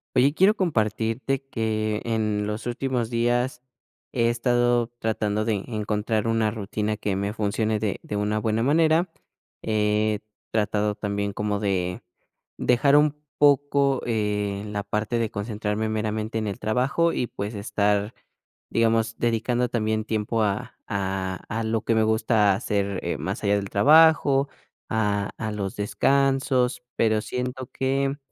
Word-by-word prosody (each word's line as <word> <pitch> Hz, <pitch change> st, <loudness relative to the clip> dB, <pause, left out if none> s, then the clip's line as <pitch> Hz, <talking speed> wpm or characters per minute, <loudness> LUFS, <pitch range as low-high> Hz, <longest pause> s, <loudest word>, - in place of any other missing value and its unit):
Oye, 140 Hz, +4 st, +4 dB
quiero 195 Hz, +5 st, +5 dB
compartirte 115 Hz, -, 0 dB
que 110 Hz, -1 st, -1 dB
en 105 Hz, -2 st, 0 dB
los 105 Hz, +3 st, -4 dB
últimos 120 Hz, -1 st, -1 dB
días 120 Hz, +2 st, 0 dB, 0.5 s
he 115 Hz, -2 st, +2 dB
estado 120 Hz, 0 st, +1 dB
tratando 110 Hz, -1 st, -1 dB
de 110 Hz, 0 st, 0 dB
encontrar 105 Hz, 0 st, -1 dB
una 115 Hz, -1 st, +1 dB
rutina 105 Hz, 0 st, -3 dB
que 100 Hz, -2 st, -2 dB
me 100 Hz, +2 st, -2 dB
funcione 110 Hz, 0 st, 0 dB
de 105 Hz, -2 st, -2 dB
de -, -, -5 dB
una 105 Hz, +1 st, 0 dB
buena 110 Hz, +1 st, 0 dB
manera. 160 Hz, +6 st, +3 dB, 0.5 s
He 105 Hz, 0 st, +1 dB, 0.3 s
tratado 105 Hz, -1 st, +1 dB
también 100 Hz, -1 st, -3 dB
como 105 Hz, 0 st, -1 dB
de 90 Hz, -3 st, -1 dB, 0.6 s
dejar 130 Hz, +4 st, +3 dB
un 150 Hz, 0 st, +3 dB, 0.2 s
poco, 140 Hz, -2 st, +3 dB
eh, 105 Hz, -3 st, -1 dB
la 105 Hz, -1 st, -3 dB
parte 105 Hz, +3 st, -1 dB
de 115 Hz, -2 st, -1 dB
concentrarme 105 Hz, +1 st, -2 dB
meramente 110 Hz, +1 st, -2 dB
en 110 Hz, -, -2 dB
el 100 Hz, -, -4 dB
trabajo 130 Hz, +9 st, +1 dB
y, -, -, 0 dB
pues, 105 Hz, +1 st, -5 dB
estar, 105 Hz, +1 st, 0 dB, 0.6 s
digamos, 115 Hz, 0 st, +1 dB
dedicando 120 Hz, +1 st, 0 dB
también 110 Hz, -1 st, -1 dB
tiempo 110 Hz, +1 st, -1 dB
a 100 Hz, -2 st, -2 dB
a 95 Hz, -1 st, -2 dB
a 115 Hz, 0 st, -2 dB
lo 110 Hz, 0 st, 0 dB
que 115 Hz, -, 0 dB
me 110 Hz, -, +3 dB
gusta 110 Hz, -2 st, +3 dB
hacer 100 Hz, -1 st, -2 dB
más -, -, -4 dB
allá 100 Hz, 0 st, +3 dB
del 100 Hz, -1 st, -4 dB
trabajo, 145 Hz, +3 st, +5 dB, 0.4 s
a 105 Hz, -2 st, 0 dB
a 110 Hz, -, -3 dB
los 100 Hz, -2 st, -4 dB
descansos, 135 Hz, +3 st, +1 dB
pero 110 Hz, -1 st, +2 dB
siento 125 Hz, +2 st, -4 dB
que 135 Hz, +1 st, 0 dB
110 Hz, 140 wpm, -25 LUFS, 105-120 Hz, 0.6 s, quiero